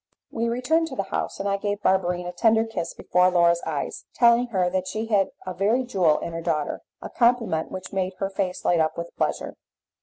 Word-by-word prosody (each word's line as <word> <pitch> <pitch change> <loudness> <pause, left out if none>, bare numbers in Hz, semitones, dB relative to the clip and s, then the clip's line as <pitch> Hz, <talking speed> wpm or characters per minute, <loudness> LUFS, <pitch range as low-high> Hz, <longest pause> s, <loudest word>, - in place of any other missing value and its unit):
We 230 0 -1
returned 305 +8 +1
to 270 - -7
the 195 - -1
house, - - -2
and 200 - -2
I 200 0 +1
gave 205 0 -3
Barberine 180 -2 +1
a 175 - -4
tender 225 +3 +3
kiss 225 -7 -5
before 180 0 +3
Laura's 170 -1 +3
eyes, 150 -3 -4
telling 235 0 +5
her 190 -6 +1
that 185 +1 -1
she 220 +1 -3
had 205 -4 +2 0.2
a 185 - -4
very 215 +8 +1
jewel 185 -11 +2
in 170 - -5
her 165 - -4
daughter 155 -3 -2 0.2
a - - -6
compliment 235 -9 +2
which 185 +1 -7
made 190 -1 -1
her 195 +1 -3
face 190 -1 -3
light 175 - +3
up 160 0 +1
with 170 0 -6
pleasure. - - -2
190 Hz, 215 wpm, -24 LUFS, 175-225 Hz, 0.2 s, telling